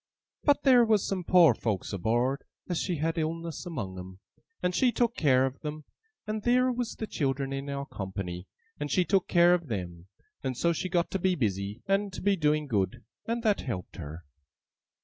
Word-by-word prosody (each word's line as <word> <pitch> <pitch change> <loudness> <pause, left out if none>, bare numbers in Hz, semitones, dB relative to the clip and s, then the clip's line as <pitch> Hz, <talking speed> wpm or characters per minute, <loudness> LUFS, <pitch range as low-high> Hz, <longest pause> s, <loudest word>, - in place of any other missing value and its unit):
But 290 -1 +3
theer 255 -3 +7
was 220 -3 +3
some 190 -2 -2
poor 175 -3 +6
folks 105 -3 -3
aboard 120 +8 0 0.2
as 175 -2 -1
had 165 -1 -1
illness 165 +2 -3
among 95 - -5
'em, 95 +1 -10 0.4
and 180 - +1
she 250 +6 +3
took 235 -1 +1
care 130 -4 +4
of 135 0 -4
them; 150 0 -6 0.4
and 215 0 -3
theer 250 +3 +3
was 245 -2 -3
the 220 - -4
children 135 -6 -1
in 135 +1 -4
our 140 0 -3
company, 95 -4 -6 0.3
and 145 0 -3
she 180 +5 +2
took 190 +3 +2
care 175 0 +5
of 175 -3 0
them; 90 -6 -5 0.4
and 130 -2 -2
so 170 +4 +2
she 185 +3 -3
got 175 -1 0
to 195 - -1
be 185 0 +2
busy, 100 - -2
and 195 +1 +1
to - - -6
be 200 0 +3
doing 150 -3 +1
good, 120 -1 -1 0.2
and 230 +1 -1
that 210 -3 +2
helped 105 -9 -5
her. 80 0 -8
155 Hz, 190 wpm, -29 LUFS, 115-190 Hz, 0.4 s, theer